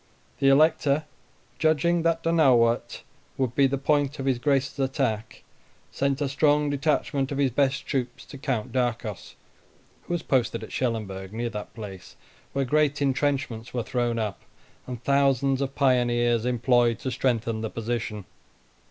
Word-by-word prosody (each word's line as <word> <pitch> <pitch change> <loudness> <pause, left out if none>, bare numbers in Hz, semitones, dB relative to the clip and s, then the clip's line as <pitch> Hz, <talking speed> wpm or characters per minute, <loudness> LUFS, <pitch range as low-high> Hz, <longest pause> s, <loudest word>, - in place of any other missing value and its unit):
The 135 -1 +4
Elector, 155 0 +4 0.6
judging 165 +2 +2
that 165 0 +1
Donauwort 130 -8 +3 0.3
would 130 -3 0
be 140 0 +4
the 140 +1 -1
point 145 +1 +1
of 135 - -4
his 130 -3 +1
Grace's 140 0 0
attack, 130 -5 -2 0.5
sent 140 +1 -1
a 145 - +1
strong 145 +1 +2
detachment 140 -1 0
of 140 - -2
his 140 -2 +2
best 135 +2 +1
troops 125 -3 -3
to 140 - -11
Count 125 -6 -2
Darcos, 120 -5 -2 0.7
who - - -2
was 175 - -4
posted 130 -4 0
at - - -9
Schellenberg, 105 -6 -3
near 120 +1 -3
that 105 0 -7
place, 100 -5 -9 0.4
where 140 0 -1
great 150 +1 +2
intrenchments 130 -4 -1
were 120 - 0
thrown 120 -1 -1
up, 105 -4 -3 0.5
and 125 -2 -7
thousands 140 -1 +2
of 135 0 -3
pioneers 120 -3 +2
employed 120 -1 +2
to 130 - -4
strengthen 115 -4 0
the 110 - -3
position. 115 -3 -4
130 Hz, 150 wpm, -26 LUFS, 120-140 Hz, 0.7 s, The